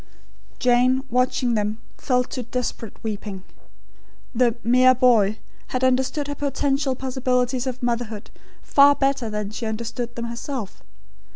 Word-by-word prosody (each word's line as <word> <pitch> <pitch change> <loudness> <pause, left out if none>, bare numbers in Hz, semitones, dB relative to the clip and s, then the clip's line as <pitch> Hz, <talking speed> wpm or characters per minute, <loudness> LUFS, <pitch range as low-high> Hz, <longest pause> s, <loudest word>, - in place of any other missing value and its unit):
Jane, 250 +1 +3
watching 250 0 +1
them, 210 0 -1 0.2
fell 250 -2 +1
to 250 - -5
desperate 240 -2 -4
weeping. 205 -3 -5 0.9
The 240 -1 +2
"mere 255 +2 +5
boy" 220 -5 +4 0.3
had 255 0 -2
understood 260 +3 +1
her 290 - -3
potential 280 -1 0
possibilities 255 -1 -1
of 255 -1 -5
motherhood 235 -3 -3 0.3
far 285 0 +6
better 270 -4 0
than 210 -1 -3
she 225 +1 -4
understood 235 +2 -4
them 235 - -4
herself. 235 -2 -6
250 Hz, 125 wpm, -23 LUFS, 230-260 Hz, 0.9 s, far